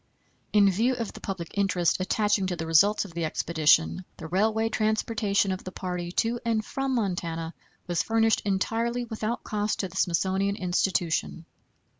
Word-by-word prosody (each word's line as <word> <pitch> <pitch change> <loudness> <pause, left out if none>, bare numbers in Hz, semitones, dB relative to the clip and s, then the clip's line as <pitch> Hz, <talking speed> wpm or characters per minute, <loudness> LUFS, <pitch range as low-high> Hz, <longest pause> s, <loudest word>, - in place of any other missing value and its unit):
In 205 -1 +5
view 235 +7 +1
of 230 -3 -4
the - - -11
public 185 -4 -5
interest 185 -4 +1
attaching 205 +1 +1
to 180 - -2
the 165 -1 -4
results 200 +7 +4
of 185 - -11
the 170 0 -3
expedition, 160 +2 +2
the - - -8
railway 215 +6 +1
transportation 215 -2 0
of 185 - -4
the 185 - -7
party 180 -2 -4
to 235 +4 0
and 225 -2 0
from 270 -1 -2
Montana 170 -6 -2 0.3
was 175 -2 0
furnished 225 -1 +2
entirely 230 +5 -1
without 220 0 -3
cost 210 0 -1
to 190 - -4
the 180 - -15
Smithsonian 190 +3 +1
Institution. 175 -3 -1
195 Hz, 160 wpm, -27 LUFS, 175-220 Hz, 0.3 s, In